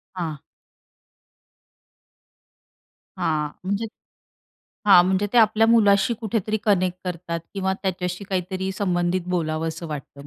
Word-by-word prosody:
हां. 160 -5 -3 2.8
हां, 150 -2 0
म्हणजे 200 +4 -1 1.0
हां, 180 -3 +8
म्हणजे 190 +2 +1
ते 245 - +5
आपल्या 220 0 +5
मुलाशी 225 -1 +4
कुठेतरी 215 -1 -1
कनेक्ट 185 -3 +2
करतात 170 -1 -4
किंवा 190 -1 0
त्याच्याशी 180 0 -3
काहीतरी 190 0 -2
संबंधित 175 -2 0
बोलावसं 160 +1 -3
वाटतं 140 -1 -8
185 Hz, 100 wpm, -23 LUFS, 170-200 Hz, 2.8 s, हां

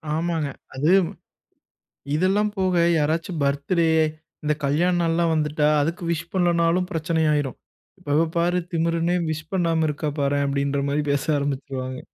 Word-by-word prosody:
ஆமாங்க. 165 -3 -1 0.3
அது, 150 +6 +2 1.2
இதெல்லாம் 200 +5 +2
போக 185 -1 +1 0.3
யாராச்சும் 160 +2 -1
பர்த்டே, 140 +5 +1 0.6
இந்த 150 0 +2
கல்யாண 170 +6 +2
நாள்லாம் 165 0 +1
வந்துட்டா, 150 -1 +1
அதுக்கு 165 +4 -2
விஷ் 170 +1 -3
பண்ணலணாலும் 175 0 +2
பிரச்சன 160 0 0
ஆயிரும். 145 -3 -1 0.5
"இவ 150 - +4 0.2
பாரு 175 +1 +2
திமிரனே 165 +1 +1
விஷ் 155 0 -5
பண்ணாம 165 -3 +1
இருக்கா 150 +1 -2
பாரேன்" 140 0 +1
அப்படின்ற 140 0 0
மாரி 145 +1 +1
பேச 140 - 0
ஆரம்பிச்சுருவாங்க. 135 -2 -3
160 Hz, 130 wpm, -23 LUFS, 145-170 Hz, 1.2 s, இவ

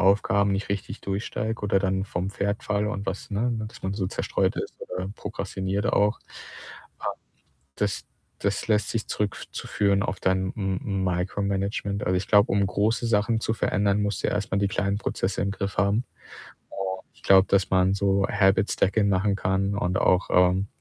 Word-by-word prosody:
Aufgaben 100 +1 +3
nicht 100 +1 -2
richtig 100 0 -4
durchsteige, 110 +3 -3
oder 100 -1 +2
dann 95 0 0
vom 90 -1 -3
Pferd 100 +1 -2
falle, 105 0 0
und 100 -1 -4
was 95 0 -4
ne, 110 +4 0
ne, 110 -2 -2
dass 110 - -12
man 95 +1 -2
so 100 -2 -1
zerstreut - - 0
ist, - - -4
oder 90 +1 -5
prokrastiniert 95 +2 -3
auch. 105 +2 +2
Ähm, - - -34 1.5
das 105 -2 -1 0.4
das 100 0 -1
lässt 105 -2 +2
sich 115 -2 -2
zurück 105 -1 -1
f - - -8
zu - - -6
führen, 100 -1 +2
auf 95 - -3
dein 95 0 +1
M 95 -1 -2
Micro-Management. 100 +2 -1
Also, 90 0 +2
ich 95 - -3
glaube, 105 +1 +5
um 100 0 +3
große 110 +5 +1
Sachen 110 +1 +2
zu 110 - 0
verändern, 100 -2 +1
musst 105 0 -1
du - - +2
erst 105 -1 -2
mal 95 - +2
die 100 0 +2
kleinen 100 +1 0
Prozesse 95 -2 -2
im 100 - 0
Griff 100 -1 -4
haben. 100 +5 +2 0.7
Und 95 -1 -4
ich - - -23
glaube, 95 0 +6
das 95 -1 +3
man 95 0 +4
so 100 -1 +2
„Habit 100 0 +3
Stackin“ 100 +2 +2
machen 100 +1 +2
kann 95 +1 0
und 90 -2 0
auch, 90 0 +3
ähm 90 +2 +4
100 Hz, 185 wpm, -26 LUFS, 95-105 Hz, 1.5 s, glaube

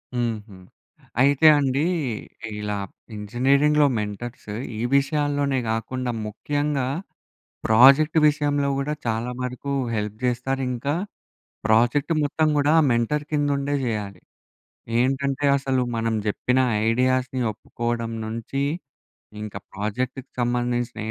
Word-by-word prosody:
హుహు. 110 -4 -3 0.6
అయితే 140 +3 +5
అండీ 140 +1 +1 0.7
ఇలా 105 0 -2 0.4
ఇంజనీరింగ్‌లో 140 +8 +3
మెంటర్స్ 105 +3 -5 0.3
ఈ - - -2
విషయాల్లోనే 145 0 +1
గాకుండా 120 +3 -2 0.2
ముఖ్యంగా 145 +5 -1 0.8
ప్రాజెక్ట్ 135 +8 +6
విషయంలో 145 -1 +1
గూడా 140 +2 -1
చాలా 115 +1 -1
వరకూ 125 +2 -4 0.2
హెల్ప్ 105 0 -3
చేస్తారు, 125 +2 -1
ఇంకా 125 +4 -2 0.7
ప్రాజెక్ట్ 120 +8 +3
మొత్తం 155 +2 +1
గూడా 145 +1 +3
ఆ - - +3
మెంటర్ 120 +6 0
కిందుండే 145 -1 0
జెయ్యాలి. 105 -5 -3 0.8
ఏంటంటే 135 +2 0
అసలు 135 -2 0
మనం 115 0 0
జెప్పిన 125 +5 +1 0.3
ఐడియాస్‌ని 130 +2 +1
ఒప్పుకోవడం 115 +2 -4
నుంచి, 115 +5 -3 0.8
ఇంక 105 -1 -7 0.2
ప్రాజెక్టుకు 125 +6 -3
సంబంధించిన 120 0 -1
130 Hz, 100 wpm, -24 LUFS, 115-140 Hz, 0.8 s, ప్రాజెక్ట్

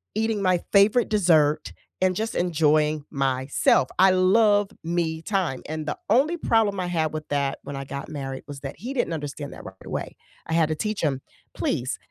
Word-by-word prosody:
eating 220 -2 0
my 185 -2 +2
favorite 215 +4 +4
dessert, 160 -7 +2 0.3
and 185 -1 +2
just 220 +2 -3
enjoying 155 -3 +2
myself. 135 -1 +2
I 190 0 +7
love 205 +2 +4 0.2
me 165 -1 -1
time 180 -10 -1
and 155 0 -4
the 150 - -3
only 290 +10 +3
problem 220 - +1
I 180 - -2
had 160 -3 -1
with 155 0 -5
that 140 -1 -1
when 140 0 -7
I 135 0 -5
got 140 +3 -6
married 135 -3 -5
was 140 -1 -8
that 135 -1 -7
he 245 +9 -6
didn't 205 -10 -1
understand 145 -1 -5
that - - -11
right 95 - -10
away. - - -5 0.3
I 160 - -4
had 160 -1 +3
to 155 - 0
teach 215 +5 -3
him, 135 -4 0 0.3
"Please, 130 +3 -2
160 Hz, 190 wpm, -24 LUFS, 145-200 Hz, 0.3 s, I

